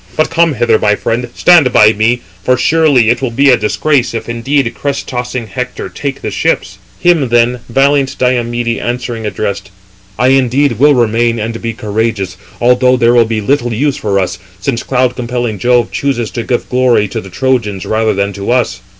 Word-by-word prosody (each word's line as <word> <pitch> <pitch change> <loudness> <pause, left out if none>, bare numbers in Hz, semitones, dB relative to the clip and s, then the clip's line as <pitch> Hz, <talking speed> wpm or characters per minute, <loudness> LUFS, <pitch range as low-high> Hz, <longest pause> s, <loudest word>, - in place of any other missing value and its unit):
But 155 - +1
come 165 -2 +2
hither, 120 -2 +2
my 105 -1 +2
friend, 120 +3 -2
stand 165 -8 +5
by 110 -2 +5
me; 115 +3 +1 0.2
for 130 +3 +2
surely 140 -4 +3
it 120 - -1
will 130 - -1
be 135 +4 +3
a - - +6
disgrace 125 +3 0
if 115 - -5
indeed 120 +2 -1
crest 140 -1 -4
tossing 125 -1 -4
Hector 125 +4 -5
take 140 -2 -5
the - - -3
ships." - - -1 0.2
Him 165 -7 +2
then 120 +1 +2
valiant 135 +2 +1
Diomede, 120 -2 -1
answering, 120 -2 -4
addressed: 100 -2 -4 0.5
"I 125 +3 +2
indeed 135 -1 +2
will 145 +1 +5
remain, 115 0 +1
and 115 +1 -4
be 115 -1 -3
courageous; 110 -4 -2 0.2
although 125 +1 +3
there 120 0 +3
will 120 -1 +4
be 110 -1 -2
little 120 +2 0
use 140 +4 0
375 - - -11
for 100 -2 0
us, 95 -1 -3 0.2
since 115 +4 -2
cloud 125 -1 0
compelling 120 -4 -3
Jove 120 -1 +2
chooses 120 -7 -2
to 120 - -4
give 120 +1 -2
glory 125 -4 +2
to 110 +3 -5
the 95 - -11
Trojans 105 -3 -1
rather 110 -1 0
than 100 +1 -1
to 100 +2 -6
us." 125 0 0
120 Hz, 190 wpm, -13 LUFS, 110-130 Hz, 0.5 s, a